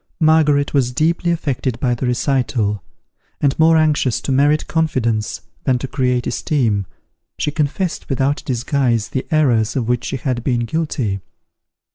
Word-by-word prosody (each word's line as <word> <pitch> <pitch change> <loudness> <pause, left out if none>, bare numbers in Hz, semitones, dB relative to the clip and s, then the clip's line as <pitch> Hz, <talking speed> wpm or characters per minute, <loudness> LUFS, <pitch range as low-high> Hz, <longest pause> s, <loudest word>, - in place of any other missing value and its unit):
Margaret 155 -3 +3
was 130 -3 +2
deeply 165 +5 +1
affected 135 -7 -1
by 125 -3 +1
the 120 +2 -2
recital; 120 -5 0 0.6
and 140 -2 +2
more 160 +1 +5
anxious 150 -6 +2
to - - -3
merit 145 +3 +3
confidence 115 -10 -1 0.2
than 130 -2 +3
to 135 - -5
create 125 -2 0
esteem, 110 - 0 0.5
she 150 - -1
confessed 155 +5 -2
without 135 +1 0
disguise, 120 -3 0
the 130 - -3
errors 125 -9 +2
of 125 -4 -1
which 120 0 0
she 135 - -3
had 125 -2 -2
been 120 -2 0
guilty. 120 -6 -2
135 Hz, 145 wpm, -19 LUFS, 120-150 Hz, 0.6 s, more